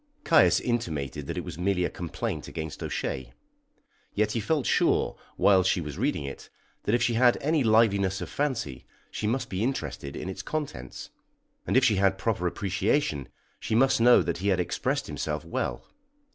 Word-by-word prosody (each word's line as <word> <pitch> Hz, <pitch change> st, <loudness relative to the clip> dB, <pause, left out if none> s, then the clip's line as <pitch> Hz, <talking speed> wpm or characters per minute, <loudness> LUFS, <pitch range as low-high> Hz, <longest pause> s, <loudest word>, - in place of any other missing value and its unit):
Caius 165 Hz, -, +5 dB
intimated 80 Hz, -, -3 dB
that -, -, -4 dB
it -, -, -2 dB
was 80 Hz, -, -8 dB
merely 90 Hz, -1 st, +1 dB
a -, -, -1 dB
complaint 85 Hz, -2 st, -4 dB
against 80 Hz, -1 st, -6 dB
O'Shea. 65 Hz, -3 st, -4 dB, 0.8 s
Yet 105 Hz, 0 st, +2 dB
he 115 Hz, -, -1 dB
felt 140 Hz, +4 st, 0 dB
sure, -, -, +2 dB, 0.2 s
while 95 Hz, -2 st, +5 dB
she 95 Hz, 0 st, +1 dB
was 75 Hz, -4 st, -6 dB
reading 75 Hz, -, 0 dB
it, 70 Hz, 0 st, -8 dB, 0.4 s
that, 105 Hz, -, +3 dB
if 120 Hz, -, +1 dB
she 120 Hz, -, +2 dB
had 120 Hz, +1 st, +4 dB
any 155 Hz, 0 st, +1 dB
liveliness 100 Hz, -4 st, +3 dB
of -, -, -5 dB
fancy, 120 Hz, -, -3 dB, 0.2 s
she 105 Hz, -, -3 dB
must 125 Hz, +2 st, -1 dB
be 95 Hz, +1 st, -3 dB
interested 115 Hz, -, -3 dB
in -, -, -5 dB
its 95 Hz, 0 st, -5 dB
contents, 115 Hz, -, -5 dB, 0.6 s
and -, -, +3 dB
if 130 Hz, -, +5 dB
she 105 Hz, -, +3 dB
had 95 Hz, 0 st, +3 dB
proper 95 Hz, -2 st, 0 dB
appreciation, 90 Hz, -, 0 dB, 0.3 s
she 110 Hz, -, -2 dB
must 130 Hz, 0 st, +4 dB
know 120 Hz, -5 st, +7 dB
that 85 Hz, 0 st, -2 dB
he 95 Hz, -, -2 dB
had 95 Hz, -3 st, +2 dB
expressed 135 Hz, -, -1 dB
himself -, -, -4 dB
well. -, -, -3 dB
100 Hz, 180 wpm, -27 LUFS, 85-120 Hz, 0.8 s, know